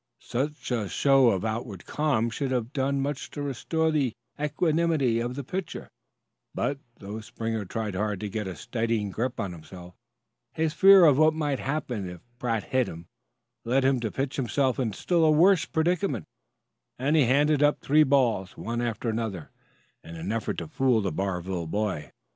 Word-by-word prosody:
Such 140 +4 -3
a 110 -5 -1
show 135 +1 +4
of 95 -2 0
outward 110 -4 -4
calm 135 -7 0
should 135 +3 -2
have 125 0 -2
done 140 0 0
much 140 0 -3
to 145 - -6
restore 160 +4 -1
the 140 -7 +1 0.3
equanimity 150 -4 +1
of 120 +2 -3
the 140 - -4
pitcher; 185 +6 -5 0.6
but, 140 0 -1 0.2
though 100 +2 -7
Springer 115 -1 -4
tried 110 +1 -3
hard 105 0 -1
to 105 - -3
get 105 0 -4
a 95 - -5
steadying 115 +1 -2
grip 125 +5 -3
on 100 -5 -2
himself, 90 +1 -11 0.6
his 160 -1 0
fear 195 -1 +8
of 145 -3 +5
what 155 0 +5
might 145 -4 -1
happen 125 -9 -3
if 90 -1 -10 0.2
Pratt 115 -3 -1
hit 130 -2 0
him 85 +1 -8 0.6
led 130 +3 +1
him 135 -1 +3
to 115 -2 -2
pitch 135 +4 -3
himself 135 0 0
into 110 -6 -2
a - - -11
still 165 -3 +3
worse 175 +2 +5
predicament; 160 - 0 0.7
and 140 +5 +1
he 150 -4 +5
handed 145 +4 +3
up 145 0 +3
three 150 +2 +3
balls, 125 -9 +1
one 120 +2 -3
after 120 0 -3
another, 110 -7 -3 0.5
in 85 - -10
an 85 +5 -4
effort 115 0 -2
to - - -4
fool 130 -7 +2
the 95 - -1
Barville 90 -1 -3
boy. 100 -4 -2
125 Hz, 175 wpm, -27 LUFS, 105-145 Hz, 0.7 s, fear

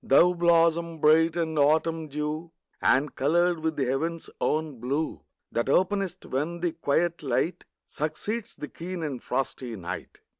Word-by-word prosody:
Thou 175 +6 +5
blossom 170 -1 +3
bright 160 +2 +4
with 160 -2 0
autumn 160 +2 +2
dew, 150 +3 -3 0.3
And 135 +2 +3
coloured 170 +4 +2
with 160 0 -1
the 140 -2 0
heaven's 160 +6 -2
own 155 -5 0
blue, 140 +6 -2 0.3
That 120 +3 -1
openest 190 +3 +1
when 160 +6 -2
the 175 -1 +1
quiet 165 +2 0
light 145 +5 -1 0.2
Succeeds 205 +10 -3
the 150 - -6
keen 175 +2 -6
and 140 -5 -4
frosty 125 -2 -3
night. 90 -4 -7
160 Hz, 145 wpm, -27 LUFS, 145-170 Hz, 0.3 s, Thou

